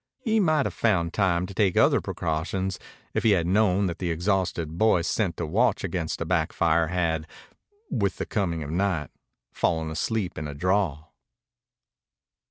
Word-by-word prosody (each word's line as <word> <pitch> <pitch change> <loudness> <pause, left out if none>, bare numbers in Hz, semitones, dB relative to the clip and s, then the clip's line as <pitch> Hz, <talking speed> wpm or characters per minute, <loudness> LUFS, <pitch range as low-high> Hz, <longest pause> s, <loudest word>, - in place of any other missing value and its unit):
He 220 -3 +2
might 155 -7 +2
have - - -2
found 90 -7 +1
time 90 -3 +1
to 100 - -9
take 95 -2 +1
other - - +4
precautions 90 +4 -2 0.3
if - - 0
he 110 -3 +4
had 85 - 0
known 100 +1 +3
that 85 -2 -3
the 90 - -2
exhausted 85 -2 -1
boy 90 -2 +3
sent 90 -1 -1
to 85 - -2
watch 110 +7 +1
against 90 -4 -3
a - - -1
back - - 0
fire 85 0 +2
had, 85 -2 -1 0.6
with 100 -2 0
the - - -3
coming 85 -6 -1
of 75 - -6
night, 90 -4 -1 0.4
fallen 80 -1 0
asleep 90 +3 -2
in 75 - -4
a 70 - -7
draw. 90 -2 0
90 Hz, 170 wpm, -26 LUFS, 80-100 Hz, 0.6 s, other